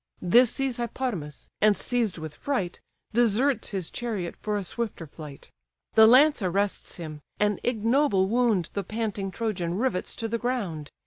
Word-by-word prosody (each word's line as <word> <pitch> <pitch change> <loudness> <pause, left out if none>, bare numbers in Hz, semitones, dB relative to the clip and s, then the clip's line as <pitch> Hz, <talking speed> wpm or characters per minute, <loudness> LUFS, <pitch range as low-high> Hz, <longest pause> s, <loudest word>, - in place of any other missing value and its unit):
This 235 +7 +6
sees 270 -1 -2
Hippodamas, 230 - -4
and 210 -1 +5
seized 235 -7 -1
with 155 -2 -6
fright, 195 - -3 0.3
Deserts 240 +2 +2
his 190 -4 -4
chariot 215 -8 -3
for 210 -1 -2
a 200 - -3
swifter 210 -2 -3
flight: 150 -2 -11 0.4
The 220 0 +8
lance 275 +3 +6
arrests 195 +2 -1
him: 155 -3 -7 0.2
an 210 -1 +1
ignoble 230 -3 +2
wound 220 -6 +1
The 200 - -2
panting 210 -1 -3
Trojan 185 -5 -2
rivets 235 -5 -1
to 225 - -3
the 230 +1 -2
ground. 200 - -3
210 Hz, 150 wpm, -26 LUFS, 180-240 Hz, 0.4 s, The